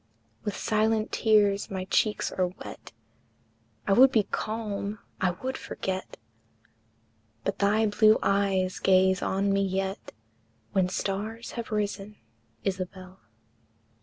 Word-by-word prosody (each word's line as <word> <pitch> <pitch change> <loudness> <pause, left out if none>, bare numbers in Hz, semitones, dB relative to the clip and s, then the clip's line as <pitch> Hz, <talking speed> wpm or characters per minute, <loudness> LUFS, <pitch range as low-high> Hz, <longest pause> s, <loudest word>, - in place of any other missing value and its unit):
With 205 - -3
silent 220 0 +1
tears 205 -2 +3
my 190 -1 -4
cheeks 210 +2 +1
are 185 -1 +1
wet, 180 - -10 0.9
I 195 - +3
would 260 +5 +7
be 220 -5 +3
calm, 215 -1 -3 0.2
I 185 - +3
would 260 0 -2
forget, 190 0 -5 1.3
But - - -2
thy 210 +2 +3
blue 215 +1 +5
eyes 195 -2 +1
gaze 190 -1 +4
on 195 +1 +1
me 195 - +2
yet, 195 0 -2 0.6
When 190 -2 +2
stars 210 +5 -3
have 235 -2 -5
risen, 210 -1 -2 0.5
Isabel. 185 -1 -4
200 Hz, 115 wpm, -27 LUFS, 190-215 Hz, 1.3 s, would